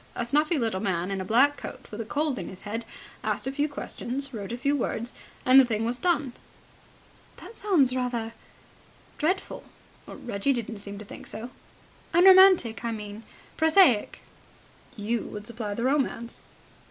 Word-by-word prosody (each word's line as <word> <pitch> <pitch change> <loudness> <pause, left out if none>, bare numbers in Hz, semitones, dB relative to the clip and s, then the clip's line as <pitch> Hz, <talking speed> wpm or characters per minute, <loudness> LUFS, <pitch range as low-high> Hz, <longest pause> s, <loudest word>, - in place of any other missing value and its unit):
A 240 - -2
snuffy 300 +6 +2
little 225 -7 -1
man 185 -2 -1
in 195 -1 -2
a - - -3
black 265 +8 +3
coat - - -8
with 215 +2 -5
a - - -5
cold 290 +2 -1
in - - -6
his 185 - -11
head 225 +3 -5 0.4
asked - - -1
a 265 - -1
few 290 +2 -1
questions, 275 -1 -5
wrote 205 -3 -6
a 240 - -3
few 280 +3 +1
words, 240 -2 -3 0.3
and 255 +1 +8
the - - +8
thing 225 -3 -1
was 240 +2 -2
done." 300 -8 0 1.0
"That - - -11
sounds 310 - +3
rather... 240 -3 -2 0.9
dreadful." 365 +5 -1 0.4
"Reggie 240 +4 -2
didn't 230 -3 -4
seem 200 0 -8
to 210 - -9
think - - -10
so." 240 +3 -6 0.6
"Unromantic, 370 - +7
I 235 - -1
mean.... 210 -1 -7 0.4
Prosaic." 320 - +4 0.7
"You 220 +2 -1
would 210 0 -8
supply 220 -3 -5
the 235 - -3
romance." 260 -3 -1
240 Hz, 165 wpm, -27 LUFS, 220-285 Hz, 1.0 s, and